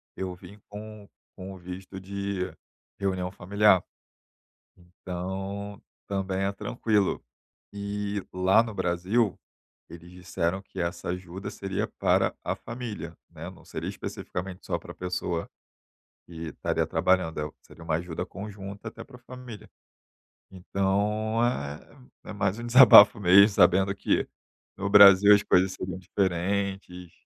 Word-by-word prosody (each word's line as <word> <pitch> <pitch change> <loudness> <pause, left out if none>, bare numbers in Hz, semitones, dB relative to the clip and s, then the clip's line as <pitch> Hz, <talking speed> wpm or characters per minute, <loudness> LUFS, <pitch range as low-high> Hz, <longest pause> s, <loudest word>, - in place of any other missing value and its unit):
eu 95 -1 -4
vim 90 +3 -14
com 105 0 -10 0.3
com 95 0 -8
o - - -11
visto 90 +2 -9
de 100 0 -4 0.6
reunião 95 -2 -1
familiar. 100 0 +3 0.9
Então, 95 +3 -6 0.3
também 95 -1 -2
é 100 - 0
tranquilo. 105 -1 -1 0.5
E 100 0 -4
lá 95 +4 +4
no 115 -3 -7
Brasil, 95 +4 0 0.5
eles 85 +1 -12
disseram 90 0 -3
que 95 - -9
essa 85 0 -3
ajuda 90 +1 -6
seria 95 -1 -3
para - - +2
a - - -2
família, 110 -9 -7
né. 80 +1 -9
Não 95 - -17
seria - - -6
especificamente 95 +1 -6
só 85 -2 -1
para 85 - -11
a - - -20
pessoa 90 -2 -3 0.8
que 85 -1 -7
estaria - - -1
trabalhando, 90 -4 +1
eh, 75 - -2
o 75 - -9
seria 85 - -15
uma 80 -1 -1
ajuda 85 0 -4
conjunta 100 +2 -8
até - - -11
para 135 - -16
a - - -22
família. 125 -2 -11 0.8
Então, 100 +4 -1
é 75 - -4 0.3
é - - -5
mais 100 -1 -1
um 120 - -6
desabafo 120 -5 +9
mesmo, 100 +2 +7
sabendo 95 -1 +3
que - - 0 0.5
no 100 +1 -3
Brasil 100 0 +9
as 100 - +3
coisas 95 +1 +3
seriam 95 0 -6
diferentes. 95 -1 -2
95 Hz, 135 wpm, -27 LUFS, 90-100 Hz, 0.9 s, desabafo